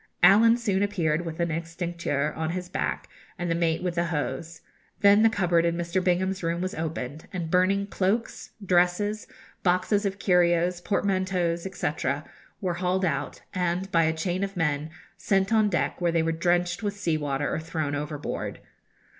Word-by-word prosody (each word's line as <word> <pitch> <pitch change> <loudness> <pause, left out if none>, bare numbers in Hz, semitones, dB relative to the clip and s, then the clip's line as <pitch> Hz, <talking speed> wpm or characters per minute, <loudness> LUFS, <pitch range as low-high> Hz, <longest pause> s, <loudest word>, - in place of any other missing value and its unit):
Allen 230 +3 +7
soon 205 -5 0
appeared 175 -5 0
with 160 0 -6
an 170 0 +1
extincteur 165 -3 -2
on 160 0 -2
his 180 +1 -3
back, - - -2 0.3
and 175 -1 -2
the - - +3
mate 165 0 0
with 180 -1 -1
the 170 0 0
hose. 165 +1 -3 0.4
Then 200 +1 +6
the 225 - +6
cupboard 180 -6 +2
in 170 0 +1
Mr. 175 +2 -1
Bingham's 185 +1 +1
room 170 0 -1
was 185 +2 -2
opened, 155 -3 -5
and 170 -4 -4
burning 190 +2 +3
cloaks, 200 +3 -1 0.2
dresses, 185 +4 +2 0.3
boxes 185 +3 +2
of 195 -1 -2
curios, 175 -1 +2
portmanteaus, 185 -3 0
&c., - - -2 0.7
were 185 -3 0
hauled 180 +2 0
out, 140 -4 -3
and, 180 +1 -1
by 165 -1 +4
a 160 - +2
chain 180 +3 -1
of 195 -1 -4
men, 150 -2 0 0.3
sent 195 +2 +1
on 215 -2 +4
deck, 150 -3 -1
where 175 -1 +2
they 165 -1 +2
were 165 - +1
drenched 175 +3 +1
with 205 -1 -3
sea 170 -5 0
water 145 -1 -1
or - - -1
thrown 155 -2 -3
overboard. 150 0 -4
175 Hz, 170 wpm, -26 LUFS, 165-190 Hz, 0.7 s, Allen